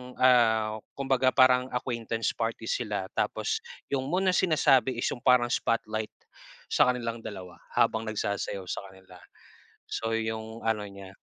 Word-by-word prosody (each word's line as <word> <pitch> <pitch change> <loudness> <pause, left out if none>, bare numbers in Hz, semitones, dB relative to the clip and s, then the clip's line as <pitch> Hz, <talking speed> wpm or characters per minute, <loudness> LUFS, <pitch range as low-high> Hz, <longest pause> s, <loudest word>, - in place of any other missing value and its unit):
ah, 110 -4 +4 0.2
kumbaga 135 -1 +1
parang 130 -1 +5
acquaintance 115 -2 -2
party 115 0 -3
sila, 105 -4 -2
tapos - - -1 0.3
'yung 135 -1 -1
moon 180 +6 0
na 185 - +4
sinasabi 140 -8 +3
is 120 - -3
'yung - - -5
parang 120 -1 +4
spotlight 110 -1 -1 0.6
sa - - +5
kanilang 120 -2 -1
dalawa 95 -5 -9 0.2
habang 110 0 +2
nagsasayaw 100 -2 -2
sa - - -3
kanila. 95 -1 -16 0.7
So 115 0 -2
'yung 110 0 -4
ano 110 -2 0
niya. 100 -1 -11
115 Hz, 140 wpm, -28 LUFS, 110-125 Hz, 0.7 s, parang